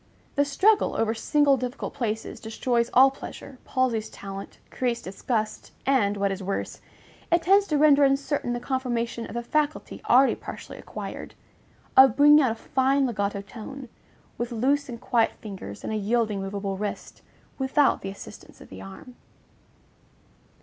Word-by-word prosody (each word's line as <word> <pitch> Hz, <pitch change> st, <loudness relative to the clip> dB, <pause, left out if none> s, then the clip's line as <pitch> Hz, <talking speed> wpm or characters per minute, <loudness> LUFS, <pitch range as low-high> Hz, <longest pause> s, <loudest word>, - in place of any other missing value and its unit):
The 285 Hz, 0 st, +2 dB
struggle 405 Hz, +10 st, +3 dB
over 225 Hz, 0 st, +1 dB
single 280 Hz, +4 st, +3 dB
difficult 250 Hz, +2 st, -5 dB
places 225 Hz, -4 st, -3 dB
destroys 235 Hz, +1 st, -1 dB
all 265 Hz, +2 st, +6 dB
pleasure, 270 Hz, -1 st, -10 dB
palsies 245 Hz, -4 st, 0 dB
talent, 195 Hz, 0 st, -8 dB
creates 245 Hz, -2 st, -1 dB
disgust, 215 Hz, +3 st, -3 dB
and, 210 Hz, -7 st, +2 dB
what 200 Hz, 0 st, +1 dB
is 195 Hz, +1 st, -4 dB
worse, 195 Hz, +1 st, -4 dB, 0.5 s
it 340 Hz, 0 st, +3 dB
tends 395 Hz, +3 st, +4 dB
to 300 Hz, -, +1 dB
render 290 Hz, -1 st, +6 dB
uncertain 275 Hz, -2 st, +1 dB
the 240 Hz, -, -2 dB
confirmation 240 Hz, -3 st, -2 dB
of 220 Hz, -, -9 dB
the 235 Hz, -, -2 dB
faculty 300 Hz, +4 st, -2 dB
already 260 Hz, +2 st, +6 dB
partially -, -, -9 dB
acquired, -, -, -8 dB, 0.6 s
of 265 Hz, -3 st, +8 dB
_bringing 295 Hz, +1 st, +7 dB
out 260 Hz, -, +3 dB
a 225 Hz, -, -2 dB
fine 270 Hz, +3 st, +1 dB
legato 200 Hz, -4 st, -2 dB
tone, 250 Hz, +5 st, -9 dB, 0.5 s
with 240 Hz, +1 st, -3 dB
loose 270 Hz, +5 st, +1 dB
and 235 Hz, -1 st, -6 dB
quiet 230 Hz, -2 st, +1 dB
fingers 190 Hz, -, -8 dB
and -, -, -3 dB
a -, -, 0 dB
yielding, 215 Hz, -1 st, 0 dB
movable 195 Hz, 0 st, -4 dB
wrist, 205 Hz, +1 st, -5 dB, 0.4 s
without 270 Hz, +2 st, +2 dB
the 195 Hz, -, -5 dB
assistance 195 Hz, -, -11 dB
of -, -, -14 dB
the 95 Hz, -, -10 dB
arm_. 95 Hz, -, -11 dB
240 Hz, 155 wpm, -26 LUFS, 215-275 Hz, 0.6 s, of